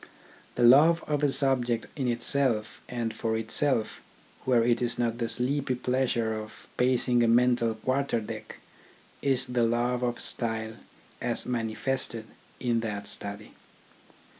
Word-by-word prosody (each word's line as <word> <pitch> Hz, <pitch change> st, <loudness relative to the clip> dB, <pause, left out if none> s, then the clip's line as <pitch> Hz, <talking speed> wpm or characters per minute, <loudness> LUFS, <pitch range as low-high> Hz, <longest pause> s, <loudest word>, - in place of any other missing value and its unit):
The -, -, 0 dB
love 155 Hz, +7 st, +6 dB
of 150 Hz, -1 st, -1 dB
a 145 Hz, -, +3 dB
subject 130 Hz, -4 st, +2 dB
in 135 Hz, -4 st, -2 dB
itself 120 Hz, -2 st, 0 dB
and 115 Hz, -2 st, -3 dB
for 110 Hz, 0 st, -2 dB
itself, 115 Hz, +1 st, 0 dB, 0.4 s
where 125 Hz, -3 st, +3 dB
it 120 Hz, 0 st, +1 dB
is 120 Hz, -1 st, 0 dB
not 120 Hz, -1 st, -1 dB
the 115 Hz, -1 st, -1 dB
sleepy 130 Hz, +1 st, 0 dB
pleasure 125 Hz, -3 st, 0 dB
of 110 Hz, 0 st, -8 dB
pacing 125 Hz, -1 st, +2 dB
a 120 Hz, -, +3 dB
mental 120 Hz, -1 st, +3 dB
quarter 130 Hz, +2 st, -1 dB
deck, 105 Hz, -, -8 dB, 0.7 s
is 135 Hz, -2 st, +1 dB
the 125 Hz, -1 st, -1 dB
love 120 Hz, +2 st, +1 dB
of 120 Hz, -1 st, -2 dB
style 110 Hz, -1 st, 0 dB, 0.5 s
as 120 Hz, -1 st, -1 dB
manifested 115 Hz, 0 st, -2 dB, 0.3 s
in 120 Hz, -2 st, 0 dB
that 105 Hz, -3 st, -4 dB
study. 100 Hz, +1 st, -2 dB
120 Hz, 140 wpm, -27 LUFS, 115-130 Hz, 0.7 s, love